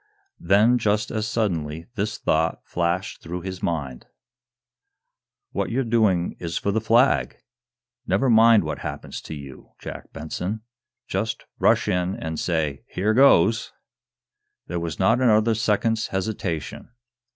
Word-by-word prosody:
Then, 110 +5 +4
just 105 0 0
as 110 -1 -2
suddenly, 85 -8 -2
this 105 -1 -2
thought 80 +1 0
flashed 90 +3 -2
through 90 +2 -5
his 95 0 -6
mind: 70 -7 -3 1.4
"What - - -2
you're 130 +3 0
doing 110 -7 +1
is 85 -1 -3
for 100 - -1
the 110 +2 0
Flag! 115 +4 +3 0.7
Never 135 - +2
mind 115 -3 +6
what 75 - -4
happens - - -6
to 80 - -7
you, 70 -3 -11
Jack - - -9
Benson. 90 +8 -4 0.5
Just - - -3
rash - - +3
in 90 +1 0
and 80 -1 -5
say 80 -5 -1
'here 105 +4 0
goes'!" 110 -5 +4 0.9
There 85 - -3
was 85 -3 -4
not 115 +7 +3
another 110 -2 +4
second's 110 +1 +1
hesitation. 95 -5 -4
95 Hz, 130 wpm, -24 LUFS, 85-110 Hz, 1.4 s, mind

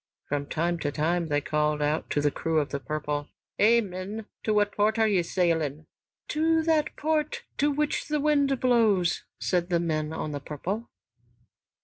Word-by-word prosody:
From 145 0 -1
time 170 +3 -1
to 145 -2 -1
time 165 +3 0
they 145 -1 +1
called 150 0 0
out 150 +2 0
to 145 - +1
the 145 0 +2
crew 165 +2 -1
of 145 - -1
"The 140 - -3
Purple": 150 0 -3 0.3
"Hei, 230 +3 +6
men, 200 +2 -6 0.2
to 220 - -1
what 205 -1 +3
port 215 +2 +1
are 220 -1 +4
ye 195 -4 +3
sailing?" 165 -4 0 0.4
"To 320 +1 +2
that 315 -2 +1
port 315 +10 -1 0.2
to 290 - +3
which 295 +1 -1
wind 290 -3 +2
blows," 220 -8 +3
said 175 -1 0
the 170 -1 +2
men 155 -2 -1
on 155 -1 -4
"The 145 - -3
Purple." 185 +11 -5
180 Hz, 170 wpm, -27 LUFS, 150-235 Hz, 0.4 s, Hei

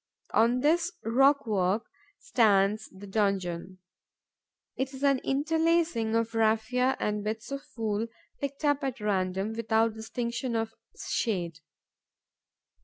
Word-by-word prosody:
On 235 +3 +3
this 335 +5 +2
rockwork 225 -6 +3 0.3
stands 215 - +2
the 190 +2 -11
donjon. 190 -3 -1 1.0
It 265 +1 -3
is 265 - -8
an 275 -2 +4
interlacing 315 -5 +1
of 230 0 0
raphia 225 +4 +2
and 210 -1 -1
bits 220 +4 -4
of 275 0 -3 0.2
wool, 220 0 -1 0.3
picked 280 +1 -4
up 290 -1 +2
at 265 -2 -2
random, 195 0 -1
without 225 0 +1
distinction 235 +2 -3
of 225 0 -1 0.3
shade. 175 -8 -1
225 Hz, 110 wpm, -29 LUFS, 210-270 Hz, 1.0 s, an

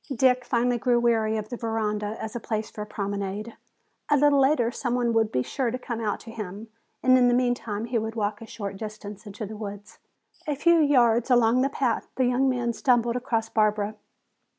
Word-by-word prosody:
Dick 250 +1 +3
finally 245 0 +1
grew 240 +2 +2
weary 225 -2 +2
of 215 0 -5
the 245 - -5
veranda 215 -2 -2
as 220 - -6
a - - -2
place 215 -1 -3
for 210 - -7
a 210 - -5
promenade. 200 +1 -4 0.5
A 290 - +4
little 285 0 +4
later 265 -4 +3
some 245 -1 -2
one 240 -2 +1
would 225 -1 +2
be 125 - 0
sure 255 - -2
to 250 - -3
come 235 -2 -5
out 210 -2 -1
to 225 - -10
him, 215 0 -7 0.3
and 255 0 +6
in 245 - +5
the 245 - +3
meantime 245 -4 -1
he 235 0 0
would 220 +1 -4
walk 210 -1 -2
a 225 - -9
short 200 -3 -6
distance 210 0 -8
into 205 +2 -6
the 215 +2 -8
woods. 205 -1 -8 0.5
A 295 - 0
few 340 +4 +4
yards 245 -5 +3
along 240 0 +4
the 270 - +2
path 255 -5 -1
the 260 - +2
young 250 +2 +2
man 240 -2 0
stumbled 235 +1 +2
across 230 -2 -1
Barbara. 215 -1 +1
230 Hz, 210 wpm, -26 LUFS, 215-245 Hz, 0.5 s, and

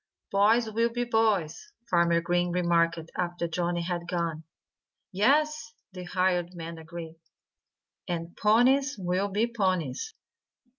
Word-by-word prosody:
"Boys 220 +4 +4
will 230 +2 +1
be 240 +1 -2
boys," 220 - 0
Farmer 170 -3 +3
Green 175 +1 0
remarked 170 -1 +2 0.2
after 175 -1 -2
Johnnie 175 +1 -1
had 175 0 -3
gone. 170 -3 -2 0.7
"Yes!" 280 +6 +1 0.2
the 180 -1 -7
hired 180 -1 0
man 165 -1 -7
agreed. 165 0 -9 0.9
"And 170 -1 -4
ponies 260 +6 +3
will 185 +1 -1
be 210 +4 +1
ponies." 185 - -2
180 Hz, 115 wpm, -28 LUFS, 170-220 Hz, 0.9 s, Boys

